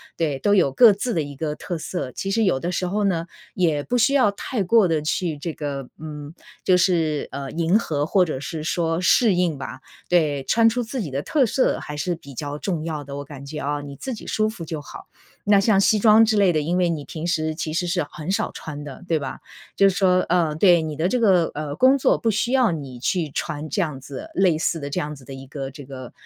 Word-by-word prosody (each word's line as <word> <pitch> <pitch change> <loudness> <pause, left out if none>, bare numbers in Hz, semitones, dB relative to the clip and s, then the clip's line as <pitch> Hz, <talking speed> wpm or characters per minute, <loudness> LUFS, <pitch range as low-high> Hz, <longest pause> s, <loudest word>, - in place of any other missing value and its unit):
对， 150 -5 -1
都 205 +9 +2
有 180 -9 +4
各 220 - +7
自 235 +5 -3
的 160 - +1
一 145 -1 -8
个 150 +1 -3
特 175 +1 -5
色。 155 -5 -4
其 195 - -4
实 225 +3 +2
有 180 -10 +2
的 175 +5 -3
时 180 +1 -1
候 205 +4 -1
呢， 170 -4 0 0.3
也 160 -5 +1
不 245 +11 -1
需 245 +4 +3
要 260 -7 +4
太 200 +3 -3
过 200 +1 +4
地 160 -2 0
去 155 0 -2
这 165 +3 -3
个， 140 -4 -5
嗯， 150 -1 -8 0.3
就 185 - +4
是， 165 -5 +1
呃， 140 0 -5
迎 170 +5 +2
合 145 -9 -1
或 185 +3 +3
者 155 -6 -3
是 155 +2 -5
说 165 +1 0
适 210 +4 +4
应 175 -4 +1
吧。 130 -1 -7 0.3
对， 150 -6 +2
穿 230 +9 +3
出 245 +2 -1
自 240 +2 -4
己 170 - -4
的 135 - -2
特 280 - +2
色 255 +3 +1
还 150 - -7
是 175 +4 -2
比 140 -4 -13
较 145 +2 -5
重 165 -1 -3
要 155 -3 -4
的， 140 0 -8
我 145 - -5
感 140 -1 -10
觉 150 +2 -6
啊， 145 +1 -2
你 140 -1 -8
自 260 - -5
己 220 - -9
舒 215 0 +1
服 190 -7 -7
就 155 -1 -5
好。 - - -11 0.4
那 200 -1 +6
像 205 -2 +3
西 215 +2 +4
装 220 +1 +6
之 220 0 +1
类 200 -3 +4
的， 155 - +1
因 160 +4 -1
为 180 -1 +2
你 155 -4 -3
平 160 0 -6
时 160 -2 0
其 155 -1 -3
实 175 +3 -1
是 170 - 0
很 155 +3 -7
少 195 - 0
穿 150 -2 -7
的， 145 +4 -10
对 165 - +2
吧？ 145 - -5 0.4
就 195 - +6
是 190 - +1
说， 185 -2 +3
呃 170 -3 +2
对， 175 0 +5
你 155 -2 -5
的 160 +3 +1
这 245 +5 0
个， 185 -6 +4
呃， 150 -1 -4
工 260 +2 +5
作 270 - +3
不 230 - 0
需 220 +3 0
要 255 -4 +4
你 135 -5 -7
去 165 +4 -1
穿 155 +1 -4
这 190 - 0
样 150 -6 -3
子 135 0 -8
类 180 -4 +3
似 165 +1 0
的 140 - -4
这 140 - -2
样 150 +1 -4
子 135 - -15
的 135 - -10
一 135 0 -10
个 135 0 -6
这 140 0 -11
个， 130 -2 -9
165 Hz, 270 characters per minute, -23 LUFS, 145-195 Hz, 0.4 s, 各